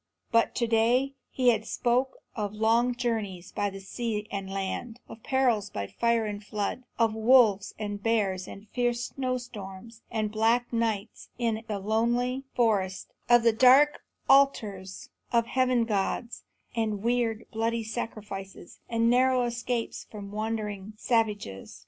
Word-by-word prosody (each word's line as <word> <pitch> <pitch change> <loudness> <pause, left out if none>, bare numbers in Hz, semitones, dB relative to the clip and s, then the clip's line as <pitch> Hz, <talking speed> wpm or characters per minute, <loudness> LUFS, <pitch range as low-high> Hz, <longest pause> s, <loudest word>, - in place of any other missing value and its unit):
But 230 -1 +3
to 240 - +1
day 235 +4 +2 0.2
he 255 -2 +3
had 220 -2 +2
spoken 250 +2 +1 0.2
of 210 -2 -3
long 230 +3 +2
journeyings 215 -7 -3
by 205 0 -1
sea 210 +2 -3
and 195 -1 -4
land; 195 +5 -4
of 225 - -11
perils 240 -5 +1
by 100 - -4
fire 235 - +1
and 205 0 -5
flood; 210 +4 -3
of 225 -2 +3
wolves 220 -3 +4
and 205 -1 -4
bears 200 -4 0
and 200 +2 -10
fierce 240 -1 -1
snowstorms 230 -4 -5
and 215 -2 -1
black 230 +3 +1
nights 225 -3 -2
in 225 -2 -1
the 210 -3 -2
lonely 240 +6 0
forest; 200 -6 0 0.2
of 240 -1 +6 0.2
dark 270 +4 +6 0.3
altars 210 -9 +2 0.2
of 235 -1 +3
heaven 255 -1 +2
gods, 220 +2 -2 0.3
and 215 -3 -1
weird, 235 -2 0
bloody 230 +1 -1
sacrifices, 210 -5 -6
and 230 -1 +2
narrow 255 +1 +4
escapes 240 0 -3
from 200 -2 -8
wandering 215 -1 -3
savages. 210 - -1
225 Hz, 135 wpm, -28 LUFS, 205-240 Hz, 0.3 s, of